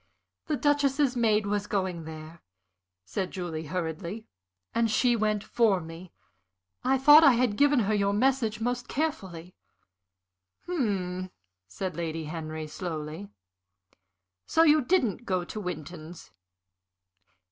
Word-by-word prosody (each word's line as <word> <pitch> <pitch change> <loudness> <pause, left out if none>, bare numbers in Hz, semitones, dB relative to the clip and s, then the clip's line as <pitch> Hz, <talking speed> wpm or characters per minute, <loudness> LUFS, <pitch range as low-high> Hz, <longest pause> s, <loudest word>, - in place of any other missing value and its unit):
The 305 -2 0
Duchess's 285 -2 +2
maid 215 -3 +2
was 205 0 -1
going 185 -5 -2
there," 160 +1 -10 0.6
said 185 - -3
Julie, 165 -4 -5
hurriedly, 175 +5 -4 0.5
"and 230 -1 +2
she 240 +3 +3
went 215 -2 0
for 220 -6 +2
me. 165 +2 -10 0.7
I 265 +1 +3
thought 295 +4 +8
I 280 -4 +7
had 240 -3 +1
given 285 0 +4
her 215 0 0
your 200 -1 +2
message 225 -1 +1
most 245 +2 -2
carefully." 190 - -3 1.1
"Hm," 190 - -2 0.4
said 180 - -5
Lady 165 -1 -3
Henry, 155 0 -5
slowly. 160 +3 -6 1.2
"So 325 - +4
you 310 -1 +5
didn't 245 - +1
go 185 -4 0
to 215 - -7
Winton's. 170 -2 -7
200 Hz, 120 wpm, -28 LUFS, 170-245 Hz, 1.2 s, thought